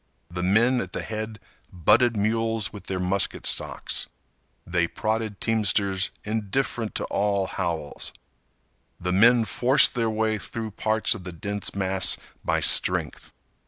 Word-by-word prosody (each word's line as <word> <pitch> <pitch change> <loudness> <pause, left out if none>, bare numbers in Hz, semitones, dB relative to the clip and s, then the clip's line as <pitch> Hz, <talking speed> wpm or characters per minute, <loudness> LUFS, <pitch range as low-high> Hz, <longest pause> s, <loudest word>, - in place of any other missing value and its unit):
The 90 0 -4
men 115 +7 +3
at 95 -3 -7
the - - -3
head 110 0 -5 0.3
butted 110 +7 +3
mules 110 +1 0
with 100 -3 -10
their 95 -1 -3
musket 95 +1 0
stocks. - - -1 0.6
They 85 -1 0
prodded 110 +2 -3
teamsters 100 -3 +1
indifferent 110 +2 -2
to - - -2
all 100 -1 0
howls. 85 -6 -4 0.9
The 90 +1 -2
men 115 +4 +5
forced 130 +5 +4
their 115 -3 0
way 110 0 0
through 110 +2 -6
parts 110 +2 0
of 105 - -7
the 90 - -6
dense 100 +5 -4
mass 95 -1 +1 0.3
by - - 0
strength. - - +3
105 Hz, 135 wpm, -25 LUFS, 95-110 Hz, 0.9 s, men